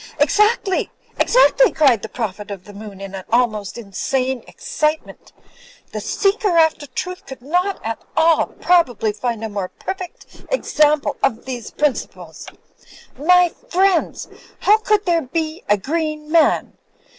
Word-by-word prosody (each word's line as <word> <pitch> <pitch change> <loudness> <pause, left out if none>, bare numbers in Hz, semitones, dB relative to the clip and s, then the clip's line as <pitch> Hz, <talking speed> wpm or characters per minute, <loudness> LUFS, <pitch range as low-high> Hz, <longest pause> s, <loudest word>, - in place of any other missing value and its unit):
'^Exactly! 400 +6 +2 0.3
exactly!" - - +5
cried 265 -9 +3
the 220 - -7
Prophet 210 -3 -5
of 195 -3 -7
the 205 - -13
Moon, 200 -1 -10
in 195 -1 -7
almost 220 -4 0
insane 255 +4 -2
excitement 305 0 -3 0.6
"The - - -5
seeker 400 -3 +1
after 320 -2 +3
truth 360 +8 -6
could 265 -2 -10
not 360 +7 0
at 225 0 -3 0.2
all 320 0 +4
probably 250 - +1
find 230 0 -3
a - - -1
more 200 -3 -4
perfect 380 -2 -8
example 305 -11 +1
of 235 -4 0
these 245 -4 -6
principles. 295 -3 -3 0.7
My 360 +3 +4
f - - -27
riendss, 375 -2 +2 0.3
how 425 +2 +5
could 425 -1 +1
there 340 -2 +2
be 315 +3 -3
a 205 - +4
green 305 - -3
man? 330 -1 +2
300 Hz, 135 wpm, -20 LUFS, 225-355 Hz, 0.7 s, exactly